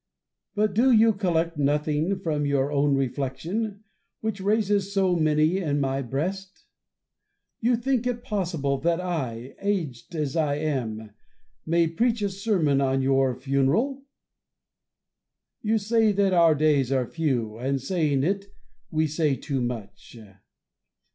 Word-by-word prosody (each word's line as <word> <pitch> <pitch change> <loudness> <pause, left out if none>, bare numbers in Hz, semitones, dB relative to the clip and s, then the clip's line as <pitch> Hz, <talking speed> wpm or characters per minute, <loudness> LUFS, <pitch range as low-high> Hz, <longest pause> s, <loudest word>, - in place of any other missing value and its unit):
But 210 -1 +1
do 245 +6 +4
you 225 -1 +5
collect 170 -5 -1
nothing 150 +5 +1
from 150 -4 -1
your 140 0 +1
own 140 -1 +2
reflection, 150 - -3 0.4
which 220 -3 -3
raises 205 -1 +1
so 190 -2 +2
many 155 +2 +2
in 145 -6 -1
my 135 0 0
breast 185 +10 -4 0.9
1 235 - +1
You 245 - +3
think 250 0 0
it 240 -1 -3
possible 165 - -1
that 170 +4 +1
I, 135 -9 -4
aged 175 - -3
as 150 -2 -2
I 150 -3 +1
am, 120 -8 -3 0.6
may 170 +1 +3
preach 225 +7 0
a 200 - 0
sermon 190 -9 +1
on 135 0 +1
your 135 -1 +2
funeral. 140 - 0 1.6
We 220 +1 +2
say 220 +1 +2
that 195 -1 +2
our 165 -3 +5
days 145 -3 +2
are 130 -2 +1
few; 120 -8 -2
and 135 +2 -1
saying 145 -2 0
it, 195 +4 -1 0.4
we 160 -1 +1
say 155 -2 0
too 135 -1 -3
much. 115 -2 -6
160 Hz, 135 wpm, -25 LUFS, 135-200 Hz, 1.6 s, you